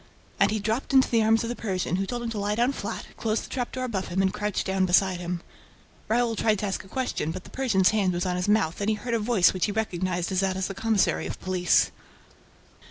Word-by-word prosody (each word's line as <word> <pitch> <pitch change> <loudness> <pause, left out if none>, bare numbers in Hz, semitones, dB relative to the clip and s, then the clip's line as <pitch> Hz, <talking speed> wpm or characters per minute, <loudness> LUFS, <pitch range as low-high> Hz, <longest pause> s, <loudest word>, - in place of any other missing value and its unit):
And - - +5
he 220 - 0
dropped 220 +6 -2
into 265 -1 +6
the 230 -1 +4
arms 225 +1 +3
of 230 - -3
the 240 - -3
Persian, 185 -5 -2
who 195 0 -1
told 240 +1 -3
him 230 - -3
to 215 - -3
lie 205 +1 0
down 240 +4 +2
flat, - - -5
closed 220 0 -1
the - - -13
trap 245 -2 -3
door 255 - -4
above 205 -7 -2
him 180 - -2
and 190 0 +1
crouched 210 -1 -2
down 190 -1 +1
beside 185 0 +3
him. 175 -1 -4 0.7
Raoul 230 0 +1
tried 215 -1 +2
to 210 - -3
ask 195 - -3
a - - -15
question, 255 -8 -2
but 185 +3 -5
the - - -14
Persian's 215 -9 +2
hand 205 -4 +2
was 175 +2 -1
on 180 -1 0
his 180 +2 -1
mouth 205 -5 +1
and 200 - +1
he 220 - +2
heard 235 +3 -4
a 230 - +2
voice 210 -4 +3
which 185 +1 0
he - - -2
recognized 185 -4 -2
as 185 - +1
that 190 -1 0
of 190 - -1
the 195 - -5
commissary 220 -1 +1
of - - -6
police. 185 -2 +2
205 Hz, 260 wpm, -26 LUFS, 185-225 Hz, 0.7 s, into